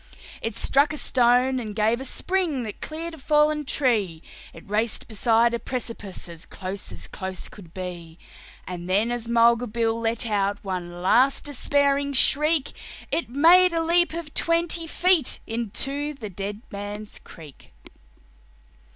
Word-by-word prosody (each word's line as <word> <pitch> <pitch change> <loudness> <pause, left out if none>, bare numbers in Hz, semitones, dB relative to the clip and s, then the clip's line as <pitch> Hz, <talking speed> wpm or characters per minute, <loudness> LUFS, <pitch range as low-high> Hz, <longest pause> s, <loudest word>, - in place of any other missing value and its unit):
It - - -3
struck 285 +3 +3
a - - -4
stone 255 0 +3
and 215 -4 -6
gave 220 +3 +1
a - - -5
spring 335 -2 -1
that 215 -2 -7
cleared 325 +2 -5
a 320 - -10
fallen 300 +1 +2
tree, 210 - 0 0.3
It - - -14
raced 215 +3 -1
beside 230 +1 +2
a 235 - -1
precipice 230 -8 -5
as 170 0 -9
close 190 +1 -6
as - - -9
close 190 -1 -6
could 175 -6 -14
be; 175 -3 -7 0.5
And 180 0 -7
then, 210 +5 +2
as 240 -1 -3
Mulga 235 +1 +4
Bill 225 0 -1
let 230 +1 0
out 200 -2 0
one 175 -2 -5
last 255 +8 +4
despairing 280 0 +1
shriek, 300 +2 +3 0.4
It 335 - -1
made 340 +7 +6
a 330 0 +1
leap 345 0 +2
of 335 -3 -6
twenty 335 0 +1
feet 350 -3 +2
into 275 +6 -3
the 215 -6 -8
Dead 200 +4 -6
Man's 205 +1 -7
Creek. 155 -5 -14
235 Hz, 150 wpm, -24 LUFS, 205-290 Hz, 0.5 s, made